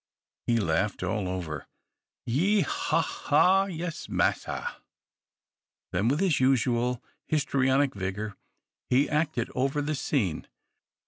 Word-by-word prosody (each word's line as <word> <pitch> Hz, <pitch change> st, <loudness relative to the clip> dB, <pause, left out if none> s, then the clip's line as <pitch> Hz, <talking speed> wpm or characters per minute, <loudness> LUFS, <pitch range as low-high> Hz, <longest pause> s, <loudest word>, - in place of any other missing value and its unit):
He 120 Hz, -, +3 dB
laughed 95 Hz, +1 st, 0 dB
all 95 Hz, +1 st, -1 dB
over. 90 Hz, -4 st, -4 dB, 0.6 s
"Ye', 185 Hz, -, +2 dB
haw, 385 Hz, -1 st, +1 dB
haw! 195 Hz, +1 st, +3 dB
Yes, 175 Hz, -3 st, -5 dB
massa." -, -, -1 dB, 1.1 s
Then, 100 Hz, +5 st, +1 dB
with 145 Hz, +7 st, +2 dB
his 185 Hz, -7 st, +2 dB
usual 125 Hz, -2 st, +2 dB, 0.2 s
histrionic 140 Hz, -2 st, +2 dB
vigor, 100 Hz, +1 st, -4 dB, 0.5 s
he 130 Hz, +3 st, +4 dB
acted 150 Hz, -5 st, 0 dB
over 135 Hz, +3 st, 0 dB
the 150 Hz, +1 st, -1 dB
scene. 125 Hz, -, -1 dB
130 Hz, 110 wpm, -28 LUFS, 105-155 Hz, 1.1 s, he